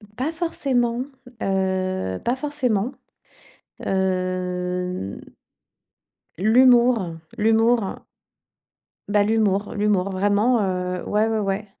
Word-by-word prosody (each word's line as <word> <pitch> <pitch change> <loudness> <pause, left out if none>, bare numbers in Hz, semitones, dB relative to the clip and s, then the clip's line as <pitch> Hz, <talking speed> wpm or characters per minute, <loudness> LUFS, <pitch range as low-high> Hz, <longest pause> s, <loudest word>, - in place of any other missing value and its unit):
Pas 270 +7 -2
forcément, 260 -8 -1 0.4
heu, 185 - -1
pas 240 +2 +1
forcément, 255 -6 -1 1.0
heu 180 - -2 1.2
l'humour, 235 -4 +4 0.2
l'humour. 225 0 +2 1.0
Bah, 205 0 +3
l'humour, 210 -2 +1
l'humour, 205 -3 +1
vraiment, 205 +5 +2
heu. 180 -2 -2
Ouais, 215 +2 +2
ouais, 220 -1 0
ouais. 200 0 -2
205 Hz, 80 wpm, -23 LUFS, 185-235 Hz, 1.2 s, l'humour